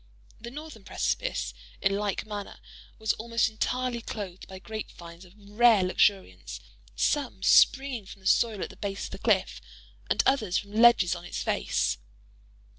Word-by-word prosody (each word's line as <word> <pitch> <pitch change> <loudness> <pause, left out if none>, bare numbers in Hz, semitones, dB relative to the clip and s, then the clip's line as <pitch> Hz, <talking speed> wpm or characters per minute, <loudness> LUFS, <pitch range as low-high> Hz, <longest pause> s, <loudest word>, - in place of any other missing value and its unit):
The 235 - -8
northern 290 -5 -10
precipice, 190 - -2 0.3
in 195 +1 +1
like 205 -1 -2
manner, 205 -2 -7 0.4
was 220 -1 0
almost 230 +1 0
entirely 245 +2 -2
clothed 195 -5 -7
by 190 - -9
grape 215 +3 -7
vines 170 +1 -12
of 180 - -18
rare 210 0 +4
luxuriance; 185 - 0 0.4
some 245 - 0
springing 265 -7 +4
from 195 - -12
the - - -20
soil 220 -4 +2
at - - -6
the - - -16
base 200 -1 -4
of - - -9
the - - -7
cliff, - - +1 0.5
and - - +2
others 215 -9 +2
from 200 - -5
ledges 220 -5 +5
on 175 -1 -7
its 175 - -5
face. - - 0
210 Hz, 160 wpm, -28 LUFS, 190-235 Hz, 0.5 s, ledges